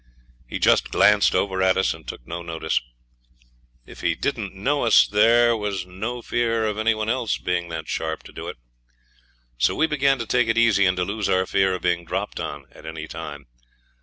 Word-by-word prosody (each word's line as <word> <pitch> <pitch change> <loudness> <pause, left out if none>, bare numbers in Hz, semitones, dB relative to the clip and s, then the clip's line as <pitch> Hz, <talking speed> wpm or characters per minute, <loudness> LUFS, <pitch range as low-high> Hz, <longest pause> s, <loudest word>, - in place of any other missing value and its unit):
He - - -4
just - - +3
glanced 105 -3 +4
over 95 0 0
at 95 0 +3
us 95 - +2
and - - -14
took - - -8
no 85 +1 -6
notice. 80 -2 -2 1.0
If - - -12
he - - +1
didn't 115 -9 -3
know 140 +9 0
us 115 - +6
there 115 +3 +4
was 100 -4 -3
no 110 +7 -5
fear 115 -2 0
of 105 0 -2
any 110 +1 +2
one 110 0 -3
else 120 -1 0
being 90 -1 -2
that 80 -1 -6
sharp 80 0 -3
to - - -13
do - - -8
it. - - -7 1.0
So 65 - +2
we 160 - +3
began 140 -3 +2
to 115 - -4
take 125 +1 +2
it 115 0 0
easy, 110 -4 +4
and 90 0 +1
to 90 - 0
lose 105 +1 -2
our 95 0 +2
fear 95 0 +1
of 90 - -8
being 85 -1 +1
dropped 95 +5 -4
on 70 -1 -5
at - - -14
any 80 -1 -6
time. 75 -4 -8
100 Hz, 205 wpm, -23 LUFS, 90-115 Hz, 1.0 s, us